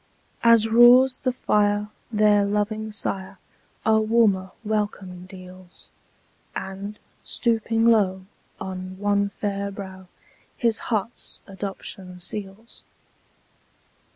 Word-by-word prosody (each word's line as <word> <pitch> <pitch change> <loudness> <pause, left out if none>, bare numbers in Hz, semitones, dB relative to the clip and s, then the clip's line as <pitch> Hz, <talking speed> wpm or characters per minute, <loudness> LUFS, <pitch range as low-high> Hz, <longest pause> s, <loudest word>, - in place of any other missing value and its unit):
As 230 -1 +6
roars 245 +3 +6
the 255 - 0
fire, 210 -3 +1 0.2
their 210 -1 +4
loving 210 +2 -1
sire 195 -2 -4 0.5
A 220 0 +4
warmer 215 -4 +2
welcome 205 -4 -3
deals; 185 -1 -12 0.6
And, 195 +2 -6 0.3
stooping 225 -1 0
low, 195 -5 +3 0.3
on 185 0 -6
one 200 0 +1
fair 200 0 -3
brow 190 -2 -9 0.5
His 230 -3 +1
heart's 225 +1 -3
adoption 190 -2 -7
seals. 200 +4 -6
205 Hz, 95 wpm, -24 LUFS, 190-220 Hz, 0.6 s, As